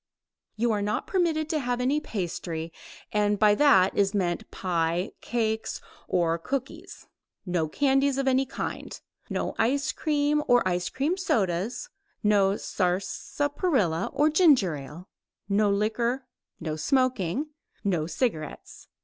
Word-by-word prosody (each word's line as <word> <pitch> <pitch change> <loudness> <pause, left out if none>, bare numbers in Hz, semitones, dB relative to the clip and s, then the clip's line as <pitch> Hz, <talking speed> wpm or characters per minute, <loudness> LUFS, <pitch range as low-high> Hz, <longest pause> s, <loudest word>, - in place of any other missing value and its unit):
You 235 +2 +1
are 210 -1 0
not 210 +1 -1
permitted 330 -5 0
to 315 - 0
have 245 -2 -1
any 265 +4 +1
pastry, 170 - -4 0.4
and 210 -1 +2
by 210 0 +5
that 200 -7 +5
is 200 0 +2
meant 175 -4 -1
pie, 175 +1 -1
cakes 220 -2 -1 0.3
or 170 -2 +1
cookies; 275 - -5 0.4
no 175 -4 0
candies 270 - +2
of 275 -1 0
any 265 0 +3
kind; - - -5 0.3
no - - -2
ice 275 +6 +2
cream 300 -1 +1
or 245 -5 +4
ice 180 0 -1
cream 305 +7 -1
sodas, 220 - -1 0.4
no 205 -1 +3
sarsaparilla 200 - -1
or 295 +3 +2
ginger 285 - +4
ale, 150 +6 -9 0.4
no 205 +1 +2
liquor, 235 +5 0 0.3
no 160 -2 -3
smoking, 255 - 0 0.3
no 175 -6 0
cigarettes. 160 - -3
215 Hz, 125 wpm, -27 LUFS, 180-275 Hz, 0.4 s, by